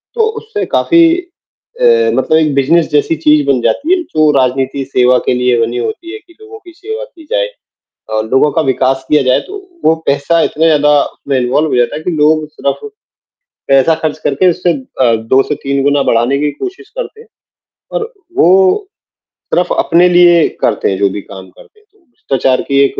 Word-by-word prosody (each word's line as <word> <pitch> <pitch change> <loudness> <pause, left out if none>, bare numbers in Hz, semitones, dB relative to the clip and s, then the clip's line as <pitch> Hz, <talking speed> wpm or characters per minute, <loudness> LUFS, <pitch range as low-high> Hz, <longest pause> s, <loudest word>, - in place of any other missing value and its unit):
तो 450 -2 +2
उससे 445 -1 -4
काफ़ी 335 0 +4
अ, 395 +7 -8 0.3
मतलब 155 - +1
एक 155 -3 +1
बिजनेस 160 +5 +2
जैसी 150 +2 +1
चीज़ 150 -2 +2
बन 135 -3 +1
जाती 305 - 0
है, 360 - -3
जो 155 - +1
राजनीति 130 +1 -1
सेवा 125 0 +4
के - - +2
लिए 125 -1 +1
बनी 115 +2 -2
होती 220 - -5
है 430 - -8
कि 350 -4 -23
लोगों 435 0 -12
की 360 -4 -15
सेवा 440 +8 -7
की 345 -10 -15
जाए। - - 0 0.6
अ, 110 - -1
लोगों 130 +3 +3
का 160 - 0
विकास 135 -1 0
किया 150 -1 +3
जाए, 130 -1 +2
तो 405 +2 -9 0.3
वो 160 - +4
पैसा 145 +4 +1
इतना 160 - -1
ज़्यादा 150 -2 +3
उसमें 140 -2 -4
इन्वॉल्व 135 +5 0
हो - - -1
जाता 120 +4 0
है 155 - -7
कि 180 - -2
लोग 155 -1 +1
सिर्फ 145 -2 -3 0.9
पैसा 135 +4 +4
खर्च 155 -2 -2
करके 145 +7 +2
उससे 175 +1 -1
अ, 130 -4 -1
2 115 +4 +1
से 150 - 0
3 140 0 -1
गुना 145 0 +2
बढ़ाने 120 +4 +1
की 150 +1 -1
कोशिश 385 - -8
करते 470 -3 -6
हैं, 455 - -17 0.6
और 460 +2 -4 0.2
वो 190 - +3 0.7
सिर्फ 180 0 +1
अपने 175 +2 +3
लिए 175 -2 +5
करते - - 0
हैं 95 - -2
जो 100 - +2
भी 100 +2 -6
काम 95 -1 -12
करते 425 - -20
हैं, 425 - -31
तो 420 - -32
भ्रष्टाचार 135 - -2
की 140 -1 +1
एक - - -4
150 Hz, 195 wpm, -13 LUFS, -, 0.9 s, लिए